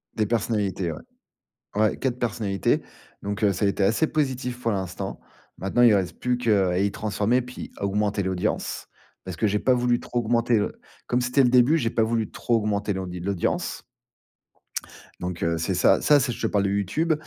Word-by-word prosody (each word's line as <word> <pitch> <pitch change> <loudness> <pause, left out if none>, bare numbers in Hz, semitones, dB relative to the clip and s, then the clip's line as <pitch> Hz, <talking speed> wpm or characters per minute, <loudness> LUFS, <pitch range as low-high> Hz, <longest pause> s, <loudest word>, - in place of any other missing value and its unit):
Des 110 - +1
personnalités, 100 -6 0
ouais. 75 - -7 0.8
Ouais, 110 0 +2
4 125 -2 -1
personnalités. 105 -5 0 0.4
Donc 100 +2 -4
heu, 100 -2 +4
ça 100 +3 0
a - - +4
été 100 0 0
assez 115 +11 +3
positif 130 -4 -2
pour 115 -2 0
l'instant. 95 -3 -4 0.4
Maintenant, 100 +7 +2
il 115 -3 +7
reste 90 -4 -1
plus 125 0 0
que, 120 -2 -2
heu, 100 -3 +4
à 90 +1 0
y 100 0 +1
transformer, 110 +4 0
puis 125 +1 -8
à 100 - -2
augmenter 100 0 0
l'audience. 95 -1 -2 0.4
Parce 95 -2 -7
que 110 - +1
j'ai 105 0 +2
pas 130 - +3
voulu 120 0 +2
trop 120 - -3
augmenter 115 0 +2
l'au 105 - 0 0.3
comme 125 0 +1
c'était 125 +3 +3
le 125 - +4
début, 125 +6 +5
j'ai 115 -6 0
pas 115 - +1
voulu 110 -1 -1
trop 120 - 0
augmenter 105 -2 0
l'audi 90 -2 -5
l'audience. 95 -1 -2 1.4
Donc 90 -1 -4
heu, 85 0 +1
c'est 90 +3 -1
ça 90 - +4
ça 145 -1 +5
c'est 125 -1 0
je - - -7
te 115 - +1
parle 100 -2 +1
de - - +1
YouTube. 125 - +1
105 Hz, 200 wpm, -25 LUFS, 95-120 Hz, 1.4 s, il